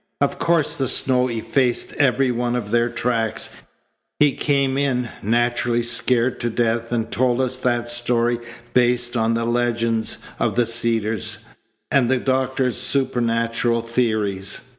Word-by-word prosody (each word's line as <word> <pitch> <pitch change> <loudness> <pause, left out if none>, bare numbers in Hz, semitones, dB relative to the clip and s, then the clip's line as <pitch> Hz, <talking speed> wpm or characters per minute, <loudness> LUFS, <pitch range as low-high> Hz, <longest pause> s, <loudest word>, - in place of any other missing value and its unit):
Of 140 - 0
course 165 -3 +1
the 135 - 0
snow 125 0 +1
effaced 120 +1 -1
every 135 -2 +3
one 120 0 -1
of 105 -4 -4
their 120 +1 +2
tracks. 115 -2 -2 0.7
He 150 -1 +4
came 140 -1 0
in, 130 -4 0
naturally 120 +2 +1
scared 120 +1 +1
to 120 - -1
death, 115 0 -1
and 115 -1 -2
told 125 0 +1
us 130 -1 0
that 120 -2 -1
story 120 0 +1 0.3
based 120 0 +2
on 115 0 +1
the 115 0 -1
legends 115 -1 0 0.2
of - - 0
the 120 0 +3
Cedars 115 -1 0 0.5
and 135 -5 +3
the 130 - +3
doctor's 130 0 0
supernatural 115 -3 0
theories. 110 -5 -1
120 Hz, 140 wpm, -21 LUFS, 115-125 Hz, 0.7 s, He